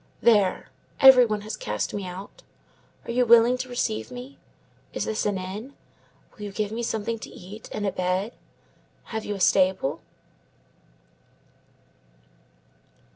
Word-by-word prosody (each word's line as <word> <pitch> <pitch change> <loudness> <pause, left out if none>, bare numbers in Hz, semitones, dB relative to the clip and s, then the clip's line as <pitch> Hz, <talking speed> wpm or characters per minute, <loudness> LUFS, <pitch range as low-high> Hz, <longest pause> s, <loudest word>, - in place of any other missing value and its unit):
There! 205 -5 +3 0.3
Every 260 -2 +9
one 210 -1 -2
has 215 +1 -5
cast 105 - -3
me 200 -2 -4
out. 190 - -9 0.6
Are - - -4
you 250 +1 +3
willing 235 +1 +6
to 255 0 -4
receive 240 -3 -2
me? 250 +2 -10 0.5
Is - - -2
this 215 -1 -1
an 205 -2 0
inn? 205 +9 -7 0.6
Will 215 - -16
you 205 - -6
give 210 +1 -2
me 230 +2 -3
something 230 0 -2
to - - -8
eat 200 +4 -11
and 210 - -3
a 195 - +1
bed? 185 +5 -1 0.8
Have 220 0 -3
you 205 - -3
a - - -7
stable?" 185 -6 +2
215 Hz, 140 wpm, -25 LUFS, 190-235 Hz, 0.8 s, Every